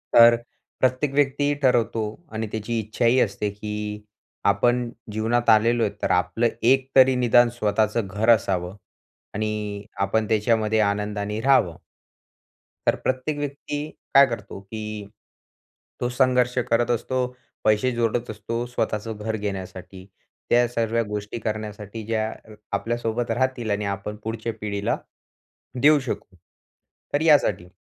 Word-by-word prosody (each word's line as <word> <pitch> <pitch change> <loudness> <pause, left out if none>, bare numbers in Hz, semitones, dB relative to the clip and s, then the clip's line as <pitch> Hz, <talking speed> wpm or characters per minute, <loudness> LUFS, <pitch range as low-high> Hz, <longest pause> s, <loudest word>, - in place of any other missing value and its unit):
तर 120 0 +9
अ, 115 - +1 0.4
प्रत्येक 130 +2 +1
व्यक्तीही 145 0 +2
ठरवतो 120 -4 +2 0.3
आणि 110 0 -3
त्याची 110 +2 -3
इच्छाही 115 +4 +2
असते, 105 -1 0
की 105 0 -5 0.5
आपण 120 +3 +1 0.2
जीवनात 115 +3 0
आलेलो 115 +2 +4
आहे, 105 - +1
तर - - 0
आपलं 90 +6 +2 0.2
एक 135 0 +3
तरी 130 0 +7
निदान 120 -1 +5
स्वतःचं 110 +1 +1
घर 105 +4 -1
असावं. 95 -5 +2 0.6
आणि 105 -1 -3
आपण 105 +2 +1
त्याच्यामध्ये 110 0 +2
आनंदाने 105 0 -1
राहावं. 130 - +3 1.1
तर - - +5
प्रत्येक 130 +3 -1
व्यक्ती 145 +1 -4 0.2
काय 140 0 +9
करतो, 105 -4 -6
की 105 0 -6 0.9
तो 120 - 0
संघर्ष 125 -1 +2
करत 120 +1 +2
असतो, 125 +2 0 0.4
पैसे 110 +4 +3
जोडत 115 +1 0
असतो, 115 +3 -4
स्वतःचं 110 -2 -2
घर 110 +1 -3
घेण्यासाठी. 95 -2 -6 0.4
त्या 120 0 +4
सरव्या 115 -1 0
गोष्टी 105 +2 -4
करण्यासाठी 105 0 -5
ज्या 110 -1 -1 0.2
अ, 110 - -13 0.2
आपल्यासोबत 115 +2 -2
राहतील 130 -4 0
आणि 100 +1 -1
आपण 105 +2 -7
पुढच्या 115 +1 -3
पिढीला 100 -1 -1 0.8
देऊ 150 +2 +6
शकू. 125 -7 -6 0.8
तर 145 - +2
यासाठी. 145 - +3
110 Hz, 125 wpm, -24 LUFS, 105-120 Hz, 1.1 s, तर